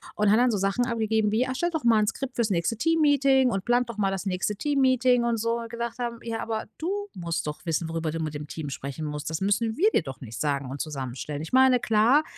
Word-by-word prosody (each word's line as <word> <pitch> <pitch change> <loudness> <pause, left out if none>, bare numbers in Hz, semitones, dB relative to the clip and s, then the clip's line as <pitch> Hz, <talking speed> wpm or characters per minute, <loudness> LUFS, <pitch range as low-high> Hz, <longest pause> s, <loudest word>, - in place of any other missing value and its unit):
Und 210 -1 +3
hat 220 - +5
dann 250 0 +4
so 210 - 0
Sachen 195 +6 0
abgegeben 220 -2 +1
wie: 235 +4 +2
„Ah, - - -6
erstellt 345 +6 -1
doch 310 - -2
mal 230 -2 +5
'n 210 - +1
Skript 255 +3 -4
fürs 230 -2 +1
nächste 180 +4 0
Teammeeting 275 -3 +3
und 195 -2 -2
plant 245 0 +2
doch 225 - -13
mal 195 -1 +2
das 195 0 -3
nächste 190 +2 -1
Teammeeting“ 255 -2 +2
und 235 -1 +1
so. 230 +2 -1
Wo - - -5
wir 230 - -8
gedacht 235 +1 -5
haben: 235 -1 -3
„Ja, 230 -1 -3
aber 220 -1 -3
du 330 +3 -2 0.2
musst 170 -2 -4
doch 150 +4 -6
wissen, 165 0 -1
worüber 165 -1 -2
du 165 - -4
mit 155 -1 -3
dem 150 0 -6
Team 150 -1 -6
sprechen 140 +3 -5
musst. 150 0 -4
Das 160 +2 -3
müssen 215 +3 +1
wir 410 - +4
dir - - +3
doch 130 0 -8
nicht 115 -3 -8
sagen 140 -3 -1
und 140 - -6
zusammenstellen.“ 145 0 -5
Ich 160 - -7
meine, 260 -1 +5
klar, 235 +7 +4
220 Hz, 260 wpm, -26 LUFS, 165-245 Hz, 0.2 s, hat